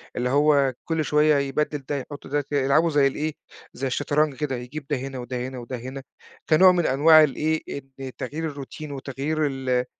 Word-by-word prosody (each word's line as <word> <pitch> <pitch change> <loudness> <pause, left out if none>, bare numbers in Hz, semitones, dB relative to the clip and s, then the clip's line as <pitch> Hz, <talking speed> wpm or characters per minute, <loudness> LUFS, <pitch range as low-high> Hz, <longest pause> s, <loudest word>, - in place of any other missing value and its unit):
اللي 125 0 -1
هو 140 -1 +3 0.2
كلّ 160 -1 +1
شوية 150 0 +4
يبدّل 145 +2 -1
ده 145 - 0
يحُط 145 +2 -9
ده، 145 +1 -1
ي - - 0
يلعبوا 140 +5 +3
زي 145 -2 +4
الإيه، 150 +3 -2 0.4
زي 135 +2 -3
الشطرنج 145 +2 0
كده، 145 -2 -2
يجيب 125 +4 -7
ده 145 - +1
هنا 135 0 -6
وده 125 0 -4
هنا 130 -1 -8
وده 120 +1 -6
هنا 130 +3 -7 0.5
كنوع 185 +4 +7
من 175 -2 +1
أنواع 155 +3 +6
الإيه، 155 +2 0
إن 135 -1 -7
تغيير 160 +2 -4
الروتين 145 +1 -8
وتغيير 140 +3 -2
ال 130 -2 -1
140 Hz, 185 wpm, -24 LUFS, 130-155 Hz, 0.5 s, كنوع